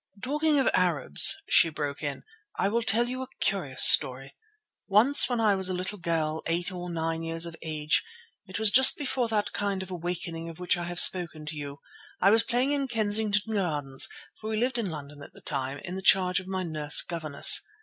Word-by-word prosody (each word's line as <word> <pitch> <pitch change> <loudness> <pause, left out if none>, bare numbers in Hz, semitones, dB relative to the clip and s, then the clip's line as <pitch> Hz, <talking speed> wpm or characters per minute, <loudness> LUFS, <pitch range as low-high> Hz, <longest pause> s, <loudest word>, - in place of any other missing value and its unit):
"Talking 300 +3 -1
of 270 - 0
Arabs," 165 - +5
she 165 - +3
broke 145 -2 -6
in, 145 -2 -6 0.3
"I 195 - -1
will 230 +3 -2
tell 230 +2 +1
you 255 +1 -6
a 260 - -7
curious 155 -10 -1
story. 135 +1 +5 0.5
Once 235 +7 +5
when 245 -2 -3
I 215 -2 +1
was 190 -1 -3
a 185 - -4
little 190 +3 -6
girl, 160 -2 -3
eight 175 +3 -2
or 180 -1 -8
nine 165 -1 -4
years 165 0 -3
of 170 -1 -9
age—it 190 - -5
was 220 -1 +3
just 265 +3 +6
before 260 -4 -3
that 215 -2 -3
kind 200 -2 -4
of 190 - -13
awakening 170 -1 -6
of 165 - -12
which 180 0 -1
I 175 -1 -6
have 175 0 -5
spoken 165 -4 +4
to 150 +1 -7
you—I 145 +6 -5
was 225 +1 +3
playing 250 +5 -2
in 280 -2 -1
Kensington 215 -2 -1
Gardens, 145 -9 -2 0.3
for 215 - -8
we 220 - -4
lived 245 +2 -2
in 210 -5 -4
London 145 -2 -10
at - - -14
the - - -13
time, 135 -1 -1
in 175 - -8
the 190 - -6
charge 185 -1 +2
of 185 - -13
my 190 -1 -5
nurse 155 -3 +3
governess. 155 -4 +2
180 Hz, 200 wpm, -25 LUFS, 160-220 Hz, 0.5 s, just